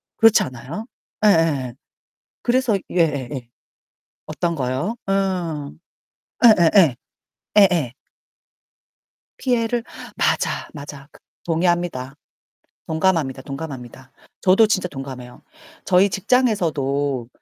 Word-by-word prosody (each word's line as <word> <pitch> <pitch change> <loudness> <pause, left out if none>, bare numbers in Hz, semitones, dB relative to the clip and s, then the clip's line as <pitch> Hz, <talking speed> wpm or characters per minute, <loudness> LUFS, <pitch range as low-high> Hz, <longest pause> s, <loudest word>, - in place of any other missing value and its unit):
그렇지 225 -1 +5
않아요? 130 - -7 0.4
예예예. 160 - +3 0.7
그래서 245 -4 +2
예예예. 140 -7 -1 0.8
어떤 170 -1 -2
거요? 135 - -2
어어. 180 -7 -1 0.7
예예예 175 - +6 0.6
예예. 170 - +4 1.4
피해를? 240 -2 0 0.3
맞아, - - 0
맞아. 145 -1 -9
그 - - -19 0.3
동의합니다. 170 -6 -1 0.7
동감합니다, 160 -5 0
동감합니다. 135 -3 -8 0.3
저도 195 +4 +5
진짜 185 -4 0
동감해요. 130 -3 -9 0.4
저희 185 +2 +4
직장에서도 145 - 0
165 Hz, 220 characters per minute, -21 LUFS, 135-195 Hz, 1.4 s, 예예예